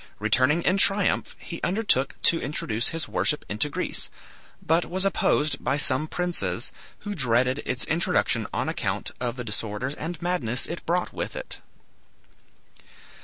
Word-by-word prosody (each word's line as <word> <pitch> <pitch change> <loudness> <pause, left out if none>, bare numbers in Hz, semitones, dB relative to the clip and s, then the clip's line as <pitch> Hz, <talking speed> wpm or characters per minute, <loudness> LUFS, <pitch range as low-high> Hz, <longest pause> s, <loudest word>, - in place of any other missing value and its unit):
Returning 130 +10 +2
in 185 - +2
triumph, 195 0 +2
he 170 - -8
undertook 180 - +1
to 165 - +3
introduce 120 -5 -2
his 165 -1 0
worship 150 - 0
into 110 +8 -1
Greece, - - 0 0.5
but 165 +2 +2
was 185 +2 -1
opposed 155 -5 +1
by 135 - +1
some 145 +1 +5
princes, 150 - -1 0.3
who 205 -1 -4
dreaded 130 - +1
its 125 +1 -1
introduction 170 +3 +1
on - - -2
account - - -2
of 120 -1 -2
the 125 - -4
disorders 110 +4 -3
and 165 +2 -5
madness 160 -9 +1
it 170 - -6
brought 175 +2 0
with - - -4
it. - - -7
150 Hz, 145 wpm, -25 LUFS, 125-175 Hz, 0.5 s, some